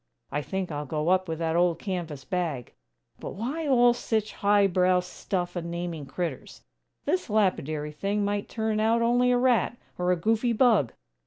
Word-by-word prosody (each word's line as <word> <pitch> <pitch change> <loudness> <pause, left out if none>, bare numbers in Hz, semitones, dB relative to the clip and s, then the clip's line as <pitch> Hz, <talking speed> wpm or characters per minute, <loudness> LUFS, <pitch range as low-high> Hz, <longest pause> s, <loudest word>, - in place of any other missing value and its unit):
I 145 - -1
think 190 +2 -3
I'll 145 -1 -4
go 155 +3 -1
up 185 0 +3
with 160 -1 -3
that 165 0 -1
old 175 -1 +3
canvas 170 -8 -5
bag! 165 - -3 0.5
But - - -7
why 275 +10 -3
all 245 -3 +5
sich 220 -3 -2
high 205 0 +3
brow 185 -1 +3
stuff 180 0 -4
in 170 -1 -4
naming 170 -4 -4
critturs? 170 +5 -5 0.4
This 365 -8 0
lapidary 155 -8 0
thing 200 +6 -1
might 205 0 -2
turn 220 -1 -1
out 225 +2 +3
only 245 +1 +3
a 245 - +4
rat, 245 -1 +2 0.2
or 180 0 +2
a - - +4
goofy 225 +7 +1
bug!" 220 - +3
185 Hz, 175 wpm, -27 LUFS, 170-220 Hz, 0.5 s, all